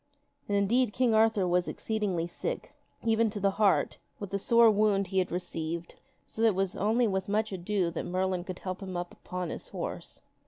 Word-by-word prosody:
And 200 - +2
indeed 220 +3 +2
King 245 -3 +2
Arthur 220 -3 +4
was 180 0 +2
exceeding 200 -6 -1
sick, 475 - -4 0.3
even 225 0 +3
to 210 0 -5
the 195 0 +2
heart, 200 -3 +3 0.2
with 200 -2 -6
the 200 - -1
sore 230 +2 +6
wound 205 -1 +2
he 190 0 +1
had 185 - -1
received, 170 -1 -4 0.3
so 220 - -7
that 230 - +6
it 215 - +2
was 195 -1 0
only 225 +4 +2
with 190 -1 -2
much 215 +1 0
ado 185 -1 -1
that 165 - -4
Merlin 185 0 0
could 185 0 -6
help 185 0 -5
him 185 -2 -5
up 175 0 -5
upon 180 -2 -5
his - - -7
horse. - - -6
195 Hz, 200 wpm, -29 LUFS, 180-220 Hz, 0.3 s, sore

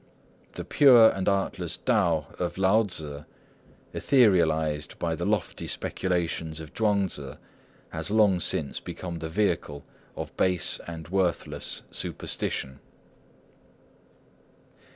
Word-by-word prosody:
The - - -6
pure 120 -6 +7
and 95 +1 -1
artless 100 -1 -1
Tao 80 -4 +1
of 90 0 -2
Lao 95 +4 +4
Tzŭ, 75 -8 -3 0.7
etherealised 80 - +2
by 85 -1 -1
the 85 +3 -3
lofty 105 -6 -2
speculations 85 -3 -2
of 80 -1 -10
Chuang 105 -3 +2
Tzŭ, 70 -6 -6 0.5
has 80 +3 -5
long 105 -4 +4
since 75 -4 -1
become 85 -2 -7
the 80 - -5
vehicle 80 -6 -1 0.3
of - - -7
base 90 -2 +2
and 80 -2 -7
worthless 95 -2 -1
superstition. 65 +1 -4
85 Hz, 110 wpm, -27 LUFS, 80-100 Hz, 0.7 s, pure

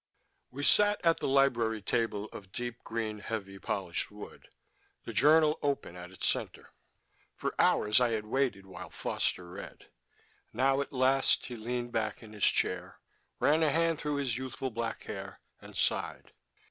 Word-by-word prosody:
We 140 +3 -6
sat 205 +7 +5
at 165 0 +4
the - - -1
library 125 -5 +3
table 105 -3 0
of 95 -2 -10
deep 120 +1 -5
green, 110 -2 -3
heavy, 100 -3 -5
polished 95 -3 -2
wood, 105 0 -11 0.5
the - - -6
journal 155 +2 +5
open 140 - -1
at 90 0 -8
its 95 - -3
center. - - -3 0.6
For - - -2
hours 105 +4 +4
I 125 - +4
had 110 -2 -1
waited 115 -4 0
while 95 - -9
Foster 90 - -2
read. - - -10 0.6
Now 135 +1 +3
at 140 - -5
last 135 +1 +3
he 125 - -6
leaned 120 +2 -3
back 110 -1 -2
in 110 -1 -12
his 105 - +1
chair, - - +1 0.4
ran 155 +3 +4
a 160 - +4
hand 165 +1 +2
through 150 -1 -1
the 140 -3 0
youthful 130 +2 -3
black 115 0 -3
hair, - - -7 0.2
and - - -10
sighed. - - -1
120 Hz, 160 wpm, -31 LUFS, 105-140 Hz, 0.6 s, sat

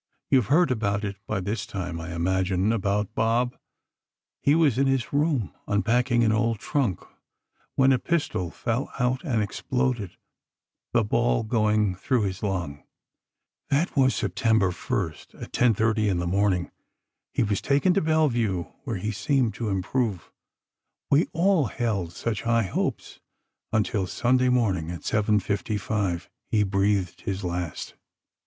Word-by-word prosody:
You 135 - +6
have 110 - -2
heard 165 +2 +4
about 105 -3 0
it 100 -1 -4
by 105 -3 -1
this 105 +5 -3
time, 90 -4 -4
I 85 +1 -6
imagine—about 95 +3 0
Bob: 120 +2 +1 0.9
He 145 - +4
was 145 -7 +3
in 135 - +3
his 135 -1 0
room, 145 - +1
unpacking 120 +4 +2
an 110 - +3
old 115 +1 +1
trunk, 115 -2 -1 0.7
when 135 0 +5
a 130 - +3
pistol 145 - -1
fell 120 +8 -3
out 125 +1 0
and 120 -10 0
exploded, 120 -1 -2 0.7
the 115 - +3
ball 115 +2 +1
going 110 -3 +2
through 115 +6 0
his 95 -2 -3
lung. 85 -8 -3 0.9
That 150 +6 +1
was 130 -2 +4
Sept, 95 -3 -3 0.2
1st, 95 -4 -2
at - - -8
10:30 110 -2 +2
in 95 - 0
the 85 - -1
morning. 95 0 +1 0.6
He - - +1
was 105 -2 0
taken 145 +7 +3
to 195 - +2
Bellevue, 120 - +1 0.2
where 115 -6 -2
he 105 +4 -2
seemed 125 +1 +1
to 110 0 -3
improve—we 105 - -3
all 175 -2 +3
held 105 -8 -2
such 105 +3 -3
high 115 -1 +2
hopes—until 100 +1 -3
Sunday 125 +7 +2
morning, 100 -10 +1
at 85 -1 -6
7:55, 105 -3 0 0.2
he 105 -2 +2
breathed 100 -1 0
his 95 0 -3
last. 90 -2 -4
110 Hz, 135 wpm, -26 LUFS, 95-125 Hz, 0.9 s, You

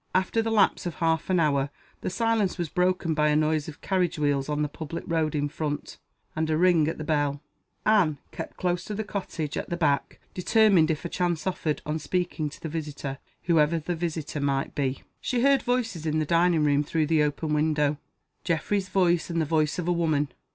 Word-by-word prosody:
After 190 +4 +2
the 225 - -1
lapse 210 -4 +3
of 175 - -5
half 165 0 0
an 185 -2 +3
hour 140 -3 +2 0.3
the - - -2
silence 225 -1 +1
was 170 -3 -2
broken 180 0 +1
by 150 0 +2
a 150 - +3
noise 155 0 +1
of 155 -1 -9
carriage 185 -4 0
wheels 145 -2 0
on 150 0 0
the - - 0
public 160 +3 -6
road 160 -2 0
in 145 0 +1
front, 145 0 -4 0.4
and 160 0 -1
a 155 - +2
ring 170 -3 +4
at 160 - -2
the 155 - -5
bell. 145 -2 0 0.5
Anne 195 -9 +4
kept - - -7
close 175 -1 0
to 210 - -4
the 220 - -2
cottage, 180 -7 -4
at - - -4
the 175 - -2
back; 145 -5 0
determined, 190 -3 +4
if 160 +1 -2
a - - -2
chance 175 -3 -1
offered, 165 -5 -2
on 155 +1 -2
speaking 165 0 -2
to 145 - -13
the - - -5
visitor, 150 -3 -5 0.2
whoever 165 -1 +3
the 165 +3 -3
visitor 160 -3 -3
might 135 -1 0
be. 135 -2 -2 0.2
She 245 -2 -1
heard 275 0 +5
voices 225 -10 -1
in 155 0 +1
the 155 - +1
dining 170 0 +3
room 145 0 +3
through 155 +1 0
the 155 0 +3
open 150 +1 -1
window 150 -1 +1 0.4
Geoffrey's 190 +3 0
voice 175 -3 +2
and 170 -1 -1
the 160 - +1
voice 155 0 +1
of 175 -1 -3
a - - +3
woman. 155 -4 +1
160 Hz, 210 wpm, -26 LUFS, 150-180 Hz, 0.5 s, heard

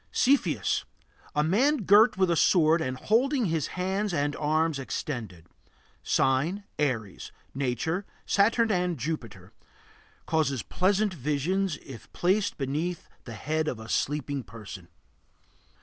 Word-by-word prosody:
CEPHEUS. 170 - +2 0.5
A 150 - +3
man 240 - +2
girt 210 +4 +6
with 185 -2 +3
a - - +3
sword 165 -1 +4
and 130 -3 -2
holding 250 - +2
his 160 -5 0
hands 190 +1 -1
and 145 -1 0
arms 155 0 +1
extended. 110 - -5 0.6
Sign: 145 +10 +1 0.2
Aries. 115 -9 -2 0.2
Nature: 140 - -2 0.2
Saturn 225 +3 +3
and 180 -3 0
Jupiter. 115 - -5 0.7
Causes 145 -6 0
pleasant 200 +2 +1
visions 155 +4 -1
if 130 -5 -11
placed 195 +3 +1
beneath 155 +6 -3 0.2
the 115 - -7
head 155 +8 -1
of 125 - -3
a 110 - -9
sleeping 145 -1 -1
person. 105 -5 -10
155 Hz, 120 wpm, -27 LUFS, 130-190 Hz, 0.7 s, girt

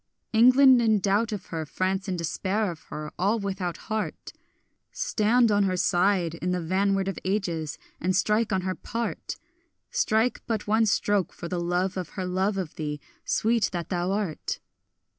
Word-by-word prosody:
England 255 +2 +7
in 220 -2 +4
doubt 205 +4 +1
of 205 -4 -4
her, 160 -1 -1
France 190 +5 -2
in 185 -2 -1
despair 190 +5 -1
of 165 - -12
her, 150 0 -6
all 200 +5 +2
without 195 -4 -3
heart— 215 -1 -4 0.6
Stand 240 - +2
on 205 -1 +3
her 185 -1 0
side 180 -2 +2
in 170 +2 -3
the 180 0 0
vanward 195 +3 +1
of 195 - -3
ages, 175 -6 -2 0.2
and 185 +2 0
strike 210 +3 +2
on 190 -1 +1
her 185 0 -1
part! 230 +4 -4 0.6
Strike 220 +2 +1
but 220 -3 -1
one 220 +1 +3
stroke 205 -2 +1
for 170 - -7
the 175 0 -2
love 180 +2 0
of 180 -3 -4
her 185 - -1
love 190 +3 0
of 180 -5 -4
thee, 150 -2 -3 0.3
sweet 225 -1 +2
that 170 -2 -3
thou 180 +1 -1
art! 195 -6 -2
195 Hz, 170 wpm, -26 LUFS, 180-215 Hz, 0.6 s, England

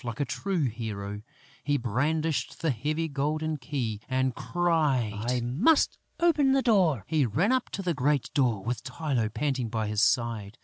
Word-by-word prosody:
Like 120 +2 -5
a 145 - +1
true 185 +5 -1
hero, 105 -4 -4 0.4
he 145 -1 +1
brandished 145 +6 -1
the 160 - +3
heavy 150 +7 -1
golden 155 +2 -1
key 120 -6 -3
and 130 0 +1
cried: 155 -10 +1 0.2
"I 125 -1 +1
must 170 - +2 0.2
open 300 -6 +4
the 270 -1 +2
door!" 175 - +3
He 155 -2 +2
ran 160 - +1
up 260 -1 +1
to 195 - -5
the 175 -2 0
great 140 -1 0
door, 120 -8 +1
with 120 +1 -3
Tylô 130 -9 -2
panting 135 -5 -1
by 110 -1 -1
his 105 0 0
side. 115 -3 +1
140 Hz, 170 wpm, -28 LUFS, 115-160 Hz, 0.4 s, open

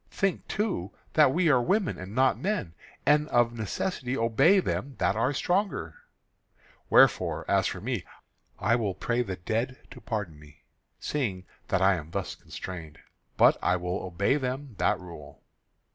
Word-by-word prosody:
Think, 195 -2 -1
too, 195 - -2 0.2
that 150 -4 +6
we 170 +4 +2
are 130 -3 +4
women 195 - 0
and 95 +3 -8
not 130 +1 +4
men, 185 - -2 0.3
and 150 +1 +4
of 120 -1 +3
necessity 125 - -3
obey 115 - +4
them 140 -6 -3
that 100 +3 +1
are 115 +5 +1
stronger. 175 - -1 1.0
Wherefore, - - +4
as - - +3
for - - -5
me, - - -2 0.5
I 110 +4 +2
will 105 -6 -1
pray 120 +5 0
the 95 -6 -3
dead 115 +8 -2
to - - -11
pardon 100 -9 -4
me, 75 -1 -18 0.4
seeing 100 -11 -2 0.2
that 95 0 +1
I 95 -1 +4
am 80 -1 -8
thus - - -3
constrained; 80 -5 -8 0.4
but - - +6
I 90 - +2
will 90 +1 -2
obey 95 - 0
them 130 -1 -4
that - - +2
rule." 85 -5 -12
115 Hz, 160 wpm, -28 LUFS, 90-145 Hz, 1.0 s, that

